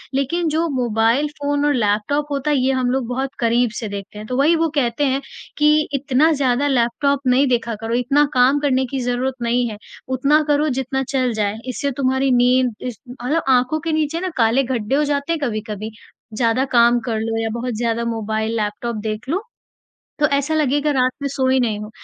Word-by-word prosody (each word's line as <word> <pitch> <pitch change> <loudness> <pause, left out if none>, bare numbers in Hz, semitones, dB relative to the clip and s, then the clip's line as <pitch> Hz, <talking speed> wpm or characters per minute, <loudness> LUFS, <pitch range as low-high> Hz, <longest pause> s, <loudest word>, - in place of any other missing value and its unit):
लेकिन 325 +6 0
जो 320 +2 0
mobile 235 +3 +1
phone 285 0 0
और 295 - +3
लैपटॉप 220 +5 0
होता 285 +1 -1
है, 290 - +2
ये 265 - +2
हम 255 -1 0
लोग 260 -2 -1
बहुत 265 +2 -2
करीब 235 +1 +2
से 225 - -4
देखते 200 +1 -7
हैं। 210 - -7
तो 250 - -3
वही 300 +5 +4
वो 330 0 +1
कहते 260 0 +1
हैं 270 +1 0 0.4
कि, 300 0 +3
"इतना 280 +3 +2
ज़्यादा 275 -2 +1
लैपटॉप 270 +2 +1
नहीं 260 +3 +4
देखा 235 -2 0
करो। 225 +1 -3
इतना 275 +4 +3
काम 260 +3 +4
करने 265 -2 +1
की 270 - -2
ज़रूरत 245 +1 -1
नहीं 240 +1 +1
है। 210 - -7 0.4
उतना 290 +4 +3
करो 295 +1 +2
जितना 265 +1 -2
चल 255 -3 0
जाए।" 210 0 -1
इससे 280 +3 -2
तुम्हारी 265 0 +1
नींद 250 0 +3
इस 245 - -6
मतलब 265 +6 -2
आँखों 255 +4 +3
के 325 +2 -3
नीचे 310 +1 0
ना 370 +1 -2
काले 235 +3 +3
गड्ढे 245 -1 -1
हो 295 - +2
जाते 285 +1 -1
हैं 330 - -2
कभी-कभी। 215 -3 -4 0.4
ज़्यादा 230 +3 +1
काम 240 0 +5
कर 225 -3 -1
लो 225 0 -2
या 225 - -1
बहुत 240 +1 -3
ज़्यादा 235 0 -1
मोबाइल 220 -1 -2
लैपटॉप 215 +2 -3
देख 215 +4 -4
लो, 360 +6 0 0.8
तो 295 - +4
ऐसा 285 +3 -1
लगेगा 295 -1 +1
रात 255 -2 +2
में 280 - -1
सोए 260 -1 +1
नहीं 220 -4 0
हो, 210 0 -7
255 Hz, 200 wpm, -20 LUFS, 235-285 Hz, 0.8 s, काम